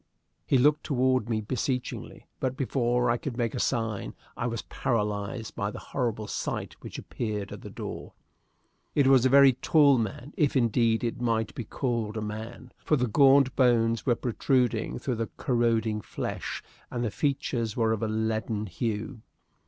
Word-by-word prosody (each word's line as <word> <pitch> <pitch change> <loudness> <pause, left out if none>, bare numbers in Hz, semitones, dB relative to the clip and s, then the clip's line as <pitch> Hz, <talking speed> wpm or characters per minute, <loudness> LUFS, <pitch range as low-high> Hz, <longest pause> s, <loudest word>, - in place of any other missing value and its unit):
He 135 - +4
looked 150 +4 +4
toward 130 -3 +1
me 110 -2 0
beseechingly, 125 +3 -3
but 130 0 -2
before 125 -2 +1
I 120 - +1
could 125 -1 -5
make 120 -3 0
a 125 - -3
sign 115 -6 -1 0.2
I 120 - -2
was 115 -2 -3
paralyzed 105 0 -2
by 100 - -1
the - - -8 0.2
horrible 115 -5 -1
sight - - -3
which - - -8
appeared 105 -3 -4
at - - -8
the - - -8
door. - - -7 0.8
It 145 - +4
was 130 -1 +6
a - - 0
very 140 0 +7
tall 140 +1 +4
man, 120 +5 -4
if, 145 -3 +1
indeed, 115 -1 +2
it 120 0 -2
might 115 -2 0
be 120 - -5
called 115 -3 -2
a - - -2
man, 110 +4 -7
for 150 - +3
the 125 -3 +1
gaunt 135 +2 +5
bones 115 -3 +3
were 120 - +2
protruding 125 +1 0
through 125 -4 -2
the 115 0 -2
corroding 115 -3 +1
flesh, - - -5 0.3
and 120 -1 -3
the 115 - -1
features 120 -5 -1
were 115 -2 +2
of 110 - -3
a 110 - 0
leaden 110 0 -1
hue. 110 +5 -3
120 Hz, 170 wpm, -28 LUFS, 110-130 Hz, 0.8 s, very